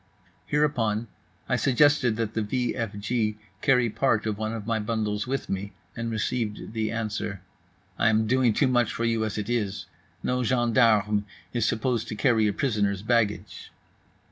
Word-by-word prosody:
Hereupon 120 Hz, -7 st, +1 dB, 0.4 s
I -, -, +1 dB
suggested 140 Hz, -3 st, +3 dB
that 110 Hz, -1 st, -2 dB
the 110 Hz, -, 0 dB
v 120 Hz, +3 st, -1 dB
f 115 Hz, -4 st, -3 dB
g 105 Hz, 0 st, -1 dB, 0.2 s
carry 125 Hz, -3 st, +4 dB
part 110 Hz, -1 st, +1 dB
of 110 Hz, -2 st, -1 dB
one 110 Hz, +1 st, -3 dB
of 115 Hz, -2 st, -5 dB
my 115 Hz, 0 st, 0 dB
bundles 105 Hz, -1 st, -2 dB
with 135 Hz, +1 st, -2 dB
me, 100 Hz, +1 st, -4 dB, 0.2 s
and 115 Hz, -1 st, -3 dB
received 110 Hz, -1 st, -2 dB
the 110 Hz, -1 st, -1 dB
answer: 105 Hz, -4 st, -3 dB, 0.6 s
"I 115 Hz, -, +4 dB
am 110 Hz, 0 st, +2 dB
doing 125 Hz, +1 st, +3 dB
too 140 Hz, -, +2 dB
much 120 Hz, -3 st, +2 dB
for 115 Hz, -, -2 dB
you 115 Hz, -1 st, +1 dB
as 110 Hz, -, -4 dB
it 105 Hz, -, -3 dB
is. 105 Hz, -5 st, -1 dB, 0.4 s
No 125 Hz, 0 st, 0 dB
gendarme 115 Hz, -4 st, +3 dB, 0.3 s
is 115 Hz, -2 st, +1 dB
supposed 115 Hz, 0 st, 0 dB
to -, -, -4 dB
carry 110 Hz, -3 st, +3 dB
a -, -, +2 dB
prisoner's 100 Hz, -5 st, 0 dB
baggage." 110 Hz, -2 st, -1 dB
115 Hz, 170 wpm, -26 LUFS, 105-120 Hz, 0.6 s, carry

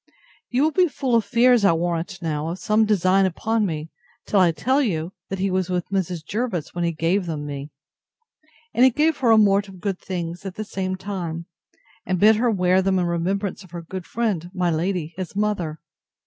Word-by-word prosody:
You 250 Hz, +3 st, +2 dB
will 315 Hz, -, +3 dB
be 360 Hz, +3 st, +3 dB
full 270 Hz, -4 st, -2 dB
of 230 Hz, -1 st, +4 dB
fears, 245 Hz, -2 st, +4 dB
I 195 Hz, -, +5 dB
warrant 170 Hz, +2 st, -2 dB
now, 155 Hz, -1 st, -2 dB
of 170 Hz, +2 st, -3 dB
some 215 Hz, +2 st, +2 dB
design 195 Hz, -2 st, +3 dB
upon 220 Hz, +4 st, 0 dB
me, 155 Hz, -1 st, -5 dB, 0.3 s
till 205 Hz, -, +2 dB
I 180 Hz, -2 st, +5 dB
tell 255 Hz, -, +1 dB
you, 175 Hz, -, -1 dB, 0.2 s
that 195 Hz, -, -3 dB
he 190 Hz, +1 st, 0 dB
was 185 Hz, -1 st, 0 dB
with 180 Hz, -2 st, -2 dB
Mrs. 180 Hz, -4 st, -2 dB
Jervis 205 Hz, -5 st, -3 dB
when 175 Hz, -, -2 dB
he 170 Hz, -, +1 dB
gave 170 Hz, +4 st, 0 dB
them 150 Hz, -3 st, -4 dB
me; 140 Hz, 0 st, -6 dB, 1.0 s
and 245 Hz, -, +4 dB
he 260 Hz, -, +8 dB
gave 305 Hz, +5 st, +1 dB
her 255 Hz, -3 st, +1 dB
a 225 Hz, -, +7 dB
mort 205 Hz, -1 st, +4 dB
of 190 Hz, -2 st, -12 dB
good 195 Hz, 0 st, -2 dB
things, 175 Hz, -1 st, -5 dB
at 190 Hz, -2 st, -6 dB
the 215 Hz, -, -4 dB
same 185 Hz, -2 st, -3 dB
time, 180 Hz, -4 st, -5 dB, 0.6 s
and 185 Hz, -1 st, -1 dB
bid 215 Hz, +2 st, +6 dB
her 240 Hz, +2 st, +2 dB
wear 185 Hz, -3 st, +3 dB
them 190 Hz, 0 st, +1 dB
in 180 Hz, -, +1 dB
remembrance 185 Hz, +4 st, -2 dB
of 185 Hz, -, -16 dB
her 170 Hz, -1 st, -7 dB
good 185 Hz, +1 st, -7 dB
friend, 205 Hz, -8 st, -1 dB
my 180 Hz, -2 st, +1 dB
lady, 170 Hz, 0 st, -1 dB
his 185 Hz, 0 st, -5 dB
mother. 200 Hz, -7 st, -1 dB
185 Hz, 210 wpm, -23 LUFS, 170-210 Hz, 1.0 s, he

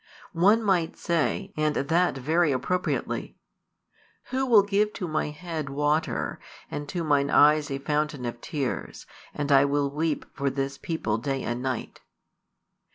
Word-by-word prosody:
One 205 Hz, +7 st, +4 dB
might 180 Hz, -5 st, +1 dB
say, 175 Hz, +4 st, -1 dB
and 155 Hz, -1 st, +1 dB
that 165 Hz, +2 st, +1 dB
very 155 Hz, +4 st, +2 dB
appropriately: 140 Hz, +8 st, -2 dB, 0.9 s
Who 265 Hz, +1 st, 0 dB
will 220 Hz, -5 st, +7 dB
give 205 Hz, +1 st, +1 dB
to 180 Hz, -, -4 dB
my 155 Hz, -1 st, -1 dB
head 155 Hz, -1 st, -5 dB
water, 150 Hz, +3 st, 0 dB, 0.3 s
and 145 Hz, 0 st, -5 dB
to 175 Hz, -2 st, -2 dB
mine 145 Hz, -2 st, +2 dB
eyes 150 Hz, 0 st, +5 dB
a 135 Hz, -, -2 dB
fountain 150 Hz, -1 st, -1 dB
of 120 Hz, 0 st, -5 dB
tears, 140 Hz, -5 st, -4 dB, 0.3 s
and 145 Hz, 0 st, -3 dB
I 135 Hz, 0 st, +7 dB
will 140 Hz, 0 st, 0 dB
weep 155 Hz, +1 st, -1 dB
for 140 Hz, 0 st, -1 dB
this 135 Hz, 0 st, -3 dB
people 140 Hz, -, -2 dB
day 135 Hz, +2 st, -2 dB
and 120 Hz, +1 st, -3 dB
night? 130 Hz, -2 st, -4 dB
150 Hz, 150 wpm, -26 LUFS, 140-170 Hz, 0.9 s, will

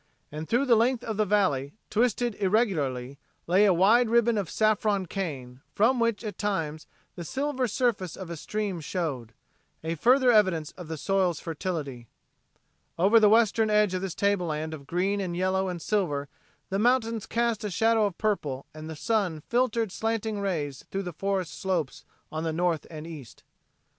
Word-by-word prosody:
And 155 Hz, +2 st, -6 dB
through 245 Hz, +4 st, +2 dB
the 245 Hz, -3 st, +5 dB
length 240 Hz, +2 st, +2 dB
of 220 Hz, -2 st, -4 dB
the 215 Hz, -1 st, +1 dB
valley, 150 Hz, -9 st, +1 dB, 0.2 s
twisted 240 Hz, +1 st, +1 dB
irregularly, 150 Hz, -, 0 dB, 0.3 s
lay 185 Hz, +5 st, +4 dB
a 200 Hz, -, +5 dB
wide 220 Hz, +7 st, +4 dB
ribbon 235 Hz, 0 st, +3 dB
of 200 Hz, -5 st, -2 dB
saffron 215 Hz, -2 st, +1 dB
cane, 135 Hz, -10 st, -5 dB
from 240 Hz, +5 st, +3 dB
which 230 Hz, -1 st, 0 dB
at 210 Hz, -4 st, -6 dB
times 160 Hz, -7 st, -2 dB, 0.3 s
the 175 Hz, -, -6 dB
silver 265 Hz, -, -1 dB
surface 215 Hz, -, -1 dB
of 185 Hz, -3 st, -7 dB
a -, -, -4 dB
stream 200 Hz, +2 st, -3 dB
showed 145 Hz, -, -3 dB, 0.5 s
a 160 Hz, +1 st, -2 dB
further 250 Hz, -, +4 dB
evidence 185 Hz, -9 st, +3 dB
of 180 Hz, -3 st, -10 dB
the 160 Hz, 0 st, -5 dB
soil's 185 Hz, -1 st, +1 dB
fertility. 150 Hz, -8 st, -4 dB, 0.9 s
Over 200 Hz, +7 st, +5 dB
the 210 Hz, -1 st, +6 dB
western 220 Hz, 0 st, +4 dB
edge 210 Hz, -2 st, +3 dB
of 185 Hz, -, -1 dB
this 190 Hz, -4 st, -4 dB
tableland 165 Hz, -6 st, 0 dB
of 140 Hz, -3 st, -9 dB
green 195 Hz, +4 st, 0 dB
and 175 Hz, -2 st, -3 dB
yellow 190 Hz, +1 st, +1 dB
and 175 Hz, -1 st, -4 dB
silver 155 Hz, -7 st, -1 dB, 0.4 s
the 195 Hz, -, 0 dB
mountains 230 Hz, -2 st, +1 dB
cast 235 Hz, -2 st, 0 dB
a 210 Hz, -, -2 dB
shadow 220 Hz, +3 st, +3 dB
of 190 Hz, -, -7 dB
purple 150 Hz, -11 st, -1 dB
and 155 Hz, +1 st, -8 dB
the 160 Hz, -, -6 dB
sun 190 Hz, -4 st, -1 dB
filtered 235 Hz, -3 st, +1 dB
slanting 220 Hz, 0 st, -2 dB
rays 155 Hz, -9 st, -3 dB
through 195 Hz, 0 st, -3 dB
the 180 Hz, -2 st, -6 dB
forest 190 Hz, -3 st, -2 dB
slopes 165 Hz, -3 st, -2 dB, 0.3 s
on 155 Hz, +1 st, -3 dB
the 165 Hz, -, -1 dB
north 170 Hz, -1 st, 0 dB
and 155 Hz, -1 st, -8 dB
east. 150 Hz, -8 st, -10 dB
195 Hz, 175 wpm, -27 LUFS, 160-220 Hz, 0.9 s, the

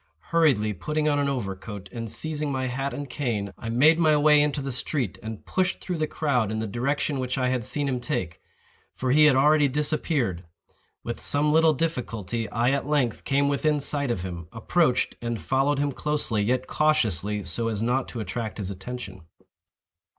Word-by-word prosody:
Hurriedly 140 Hz, -11 st, +3 dB
putting 150 Hz, -, -2 dB
on 145 Hz, -1 st, +2 dB
an 140 Hz, -1 st, +1 dB
overcoat, 100 Hz, -5 st, -5 dB
and 115 Hz, -1 st, -5 dB
seizing 150 Hz, +3 st, -2 dB
my 130 Hz, -1 st, -1 dB
hat 135 Hz, +2 st, -2 dB
and 145 Hz, -1 st, -5 dB
cane, 115 Hz, -7 st, -3 dB
I 115 Hz, -, -7 dB
made 150 Hz, +8 st, +5 dB
my 155 Hz, -2 st, +4 dB
way 150 Hz, 0 st, +5 dB
into 145 Hz, 0 st, 0 dB
the 135 Hz, -1 st, -3 dB
street, 120 Hz, -, -1 dB
and 110 Hz, -1 st, -7 dB
pushed 180 Hz, -1 st, 0 dB
through 180 Hz, -3 st, -4 dB
the 155 Hz, -, +1 dB
crowd 125 Hz, -11 st, 0 dB
in 110 Hz, -, -2 dB
the 110 Hz, -, -2 dB
direction 135 Hz, +6 st, -1 dB
which 130 Hz, 0 st, -2 dB
I 130 Hz, -1 st, +1 dB
had 125 Hz, -2 st, -1 dB
seen 145 Hz, +6 st, -1 dB
him 130 Hz, -2 st, -1 dB
take; 90 Hz, -, -3 dB, 0.5 s
for 130 Hz, -1 st, -1 dB
he 150 Hz, +3 st, +6 dB
had 150 Hz, -3 st, +6 dB
already 150 Hz, +2 st, +5 dB
disappeared. 140 Hz, -, -1 dB, 0.6 s
With 120 Hz, -, -5 dB
some 150 Hz, +1 st, +2 dB
little 160 Hz, 0 st, +5 dB
difficulty 115 Hz, -, -2 dB
I 120 Hz, +2 st, +1 dB
at 140 Hz, 0 st, -1 dB
length 140 Hz, -6 st, 0 dB
came 140 Hz, +1 st, +2 dB
within 150 Hz, +1 st, +1 dB
sight 140 Hz, -1 st, 0 dB
of 95 Hz, -7 st, -1 dB
him, 85 Hz, -3 st, -6 dB
approached, 125 Hz, +4 st, +1 dB
and 120 Hz, -1 st, -3 dB
followed 135 Hz, +2 st, +1 dB
him 145 Hz, 0 st, 0 dB
closely, 145 Hz, -7 st, -1 dB
yet 125 Hz, +4 st, 0 dB
cautiously, 105 Hz, -, +1 dB
so 105 Hz, +7 st, -1 dB
as 110 Hz, -1 st, -1 dB
not 125 Hz, +3 st, 0 dB
to 120 Hz, -, -6 dB
attract 110 Hz, +2 st, -4 dB
his 100 Hz, -2 st, -2 dB
attention. 100 Hz, 0 st, -7 dB
130 Hz, 185 wpm, -26 LUFS, 110-150 Hz, 0.6 s, he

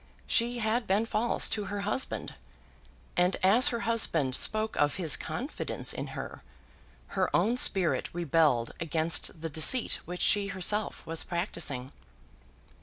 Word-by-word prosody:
She 240 Hz, +1 st, +1 dB
had 225 Hz, +1 st, -1 dB
been 200 Hz, +4 st, +1 dB
false 230 Hz, +1 st, +1 dB
to 210 Hz, -2 st, -2 dB
her 200 Hz, +1 st, -5 dB
husband; 210 Hz, +6 st, -2 dB, 0.8 s
and 180 Hz, +1 st, +2 dB
as 215 Hz, +7 st, +6 dB
her 235 Hz, -1 st, -1 dB
husband 170 Hz, -, +1 dB
spoke 215 Hz, +10 st, +1 dB
of 145 Hz, 0 st, +1 dB
his 170 Hz, -4 st, +1 dB
confidence 270 Hz, +5 st, -2 dB
in -, -, -5 dB
her, -, -, -7 dB, 0.7 s
her -, -, -1 dB
own 235 Hz, +3 st, +2 dB
spirit 190 Hz, -8 st, +3 dB
rebelled 155 Hz, -8 st, +1 dB
against 160 Hz, 0 st, 0 dB
the 165 Hz, -, -3 dB
deceit 220 Hz, -, +4 dB
which 180 Hz, +1 st, -7 dB
she 205 Hz, -1 st, +2 dB
herself 200 Hz, +2 st, -1 dB
was 165 Hz, 0 st, -2 dB
practising. 145 Hz, -7 st, -3 dB
190 Hz, 135 wpm, -28 LUFS, 165-220 Hz, 0.8 s, as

